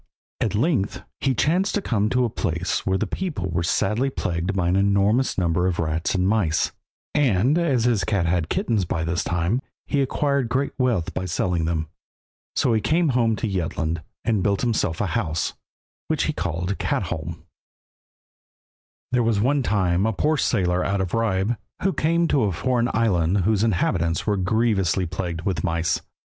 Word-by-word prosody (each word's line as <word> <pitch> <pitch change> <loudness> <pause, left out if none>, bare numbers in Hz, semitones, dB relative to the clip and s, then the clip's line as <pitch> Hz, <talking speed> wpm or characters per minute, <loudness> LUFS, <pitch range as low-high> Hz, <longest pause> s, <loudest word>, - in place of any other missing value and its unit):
At - - 0
length 115 - 0 0.2
he 135 -1 +1
chanced 180 +9 +1
to - - +2
come 105 -3 +1
to 125 +1 +2
a - - 0
place 90 -2 -2
where 95 0 +2
the 110 - -1
people 110 - -3
were 85 +1 0
sadly 105 +9 +1
plagued 90 -5 -2
by 90 -3 +1
an 90 - +2
enormous 100 +6 +2
number 90 0 +1
of 90 -2 -1
rats 80 +2 -1
and 90 0 +2
mice, 95 -8 +1 0.4
and 130 -2 +3
as 150 -9 +2
his 115 -5 +2
cat 95 -1 0
had 85 - +1
had 85 -3 -1
kittens 110 -5 0
by 80 -1 -2
this 85 +1 -1
time, 90 +8 0 0.2
he 140 - 0
acquired 140 -2 0
great 135 +3 0
wealth 120 -10 +1
by 95 - -3
selling 90 -1 0
them. 80 -1 -1 0.7
So 120 - +2
he 110 - +2
came 165 +4 +2
home 120 -3 +2
to 115 - -2
Jutland, 85 -4 -2 0.2
and 110 -4 +2
built 100 0 +1
himself 105 -8 0
a - - +1
house, 80 -2 -1 0.5
which - - 0
he - - 0
called 90 +2 -3
Katholm. 80 +1 -3 1.7
There 125 -1 +3
was 115 -3 +2
one 135 +6 +2
time 95 -4 +1
a 110 - 0
poor 155 +9 +1
sailor 90 -7 +1
out 100 0 0
of 90 -2 -3
Ribe, 110 0 +1 0.3
who 190 0 +2
came 170 +2 +2
to 135 -6 +3
a 100 - +1
foreign 120 +7 0
island 95 -4 +2
whose 105 +2 +2
inhabitants 85 -5 +1
were 105 - +1
grievously 95 -2 +1
plagued 85 -1 -4
with 95 0 -1
mice. 85 -2 0
100 Hz, 175 wpm, -23 LUFS, 85-120 Hz, 1.7 s, and